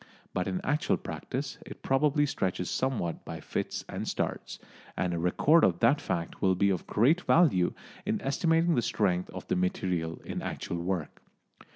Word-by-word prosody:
But 90 - -1
in 95 -1 -2
actual 150 +3 +1
practice 135 +2 -5
it - - -11
probably 145 +2 +3
stretches 95 -9 -2
somewhat 120 -11 -1
by - - -6
fits - - -4
and - - -5
starts, - - -3 0.4
and 90 -1 0
a 85 - -1
record 145 - +4
of 85 -2 +3
that 120 +6 +4
fact 85 -1 -3
will 95 -1 +3
be 100 +2 +3
of 90 - -3
great 140 +12 +3
value 140 - +4 0.3
in 215 +2 -1
estimating 165 +4 +2
the 120 - +2
strength 95 -6 0
of - - -8
the - - +1
material 90 -2 -1
in - - -4
actual 85 - -4
work. 85 -2 -3
100 Hz, 170 wpm, -29 LUFS, 90-145 Hz, 0.4 s, record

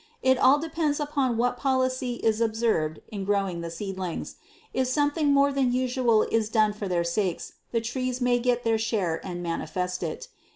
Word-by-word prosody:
It 260 -1 +4
all 265 +3 +6
depends 315 -1 -1
upon 280 -5 0
what 245 +1 +1
policy 255 -2 0
is 220 0 +2
observed 220 -9 0
in 200 -2 -5
growing 195 -3 0
the 170 - -5
seedlings; 185 0 -5 0.4
if 260 0 +1
something 290 +2 +1
more 280 0 +4
than 265 -3 +2
usual 250 -3 +2
is 225 -1 0
done 215 -2 +3
for 210 -1 -5
their 175 -2 +1
sakes, 175 +1 -2 0.2
the 230 - +1
trees 255 +2 -2
may 245 -1 +2
get 245 0 +1
their 225 -1 +2
share 195 -7 -1
and 175 -2 -5
manifest 180 +2 -3
it. 165 -3 -4
230 Hz, 175 wpm, -26 LUFS, 195-255 Hz, 0.4 s, all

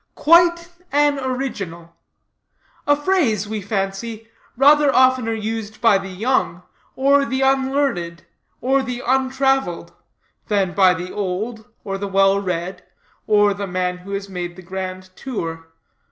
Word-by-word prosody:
"Quite 340 +2 +4 0.2
an 290 0 +2
original:" 200 -11 -5 0.9
A 290 - +5
phrase, 290 - +1
we 215 0 -4
fancy, 200 +3 -4 0.3
rather 290 +1 +5
oftener 255 -3 +3
used 220 0 -5
by 220 -4 +4
the 195 0 -7
young, 185 -3 -1 0.3
or 280 +1 +3
the 265 0 -2
unlearned, 265 -11 0 0.4
or 270 +2 +2
the 250 -1 -5
untraveled, 265 -6 0 0.5
than 195 -4 0
by 185 -2 +4
the 180 +2 -6
old, 210 +3 -4 0.2
or 195 -2 -4
the 200 - -3
well 195 0 +3
read, 180 -1 -4 0.4
or 205 -1 +4
the 200 0 -5
man 180 0 -2
who 195 +2 -9
has 200 0 -4
made 175 -2 -5
the 185 - -12
grand 185 +1 -6
tour. 165 -11 -5
210 Hz, 135 wpm, -20 LUFS, 185-265 Hz, 0.9 s, A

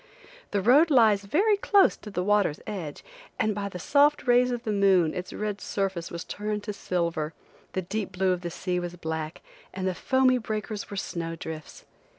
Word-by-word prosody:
The 200 -2 -1
road 285 - +6
lies 220 -7 +4
very 405 - +3
close 400 -1 +4
to 210 - -10
the 180 -3 -2
water's 205 -6 +2
edge, 180 -9 -6 0.3
and 215 - +1
by 200 0 -3
the 180 - -7
soft 285 - +3
rays 245 0 +4
of 245 -1 -3
the 220 - -2
moon 190 -5 +3
its 180 - -5
red 210 -1 -4
surface 190 -4 -2
was 170 0 -5
turned 210 0 -4
to 210 - -4
silver, 170 -5 -2 0.4
the 185 - -1
deep 195 +1 -4
blue 185 +1 +1
of 180 -1 -1
the 175 - -4
sea 180 +1 -2
was 175 0 -5
black, 160 -2 -5 0.3
and 190 0 -3
the 185 - 0
foamy 260 +5 +2
breakers 215 -2 -4
were 200 - -6
snow 165 -3 -3
drifts. 160 -1 -8
200 Hz, 190 wpm, -27 LUFS, 175-220 Hz, 0.4 s, road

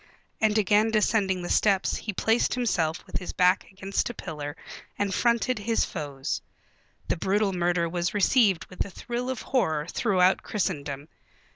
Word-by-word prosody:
And 215 0 +2
again 210 +1 +3
descending 205 -4 +1
the 175 - -5
steps 195 -3 +2
he 215 - -4
placed 225 +5 +1
himself 175 -10 0
with - - -4
his 180 - -6
back 180 +1 +3
against 195 +3 -2
a 240 - -7
pillar 150 -3 -6 0.4
and 200 -1 -1
fronted 235 +2 +1
his 225 +2 +1
foes.... 145 -5 -4 0.7
The - - 0
brutal 195 +3 +1
murder 175 -1 +1
was 175 +1 -1
received 205 -3 +3
with 185 - -4
a - - -9
thrill 240 +5 -4
of 260 -3 -4
horror 160 - 0
throughout 185 -2 +2
Christendom. 150 -8 -3
190 Hz, 155 wpm, -26 LUFS, 175-220 Hz, 0.7 s, again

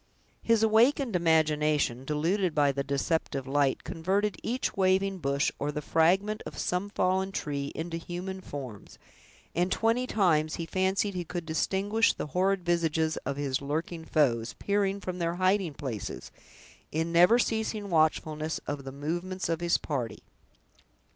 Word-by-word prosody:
His 230 -1 +3
awakened 230 +2 +3
imagination, 155 -6 +2
deluded 165 +5 0
by 145 -2 +4
the 140 0 -2
deceptive 140 -1 -1
light, 140 0 +1
converted 195 +5 0
each 250 +3 -2
waving 190 0 +2
bush, 140 -2 +1
or 145 +1 -1
the 150 - -3
fragment 190 +8 +2
of - - -9
some 180 +3 -1
fallen 190 0 0
tree, 140 -6 -3
into 165 +1 -3
human 180 +3 -6
forms, 130 - -8 0.6
and 175 +2 +1
twenty 230 +3 +1
times 155 -8 +2
he 165 - -4
fancied 190 +3 0
he 180 -1 -3
could 175 0 -5
distinguish 195 +7 +1
the - - -4
horrid 190 0 +1
visages 160 -2 +1
of 140 0 -2
his 140 -2 -1
lurking 160 +4 -3
foes, 120 -8 +1
peering 200 -1 0
from 180 -1 -5
their 170 0 -1
hiding 185 -3 +1
places, 125 -9 -5 0.6
in 160 +2 -1
never 180 +7 +6
ceasing 220 -3 -1
watchfulness 155 -1 +1
of 145 -2 -4
the 135 - -5
movements 175 +7 -3
of 165 0 -1
his 170 0 +3
party. 125 -7 -4
170 Hz, 145 wpm, -29 LUFS, 150-190 Hz, 0.6 s, never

